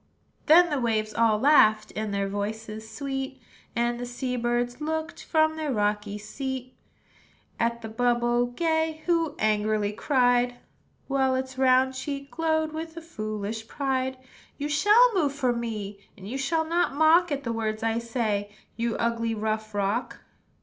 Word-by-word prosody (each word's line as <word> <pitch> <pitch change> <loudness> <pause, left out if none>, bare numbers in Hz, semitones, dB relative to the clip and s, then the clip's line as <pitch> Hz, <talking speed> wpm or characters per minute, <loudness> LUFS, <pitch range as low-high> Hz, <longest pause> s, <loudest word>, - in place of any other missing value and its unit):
Then 340 +2 +7
the 290 - 0
waves 215 -2 0
all 225 -2 +3
laughed, 215 -5 +4
In 215 0 -3
their 200 -1 -1
voices 215 +2 -5
sweet; 270 0 -4 0.4
And 240 +1 0
the 245 - -4
sea 250 +1 -3
birds 240 +2 -1
looked, 315 +2 -3
From 315 -1 +2
their 310 -3 -2
rocky 210 -2 -1
seat, 260 +3 -5 0.8
At 235 0 0
the - - -4
bubble 240 +1 +1
gay, 320 +3 -1
Who 330 -3 +1
angrily 215 -1 +1
cried, 245 0 +2 0.5
While 265 -1 +2
its 260 0 -3
round 260 0 +4
cheek 275 +1 -5
glowed 315 +1 0
With 320 +1 -6
a - - -5
foolish 215 -6 -5
pride, 260 -2 -1 0.4
"You 290 +1 -3
shall 420 +11 +5
move 305 -8 +1
for 260 -4 +1
me; 215 -4 -4 0.2
And 190 0 -10
you 240 - -5
shall 320 +4 0
not 340 -3 +1
mock 320 +3 +5
At 280 -1 -2
the 230 - -2
words 220 -1 -2
I 225 0 +1
say, 225 -4 -2 0.3
You 230 0 -1
ugly, 230 -1 -1
rough 215 0 -3
rock! 205 +5 -1
245 Hz, 155 wpm, -26 LUFS, 220-290 Hz, 0.8 s, Then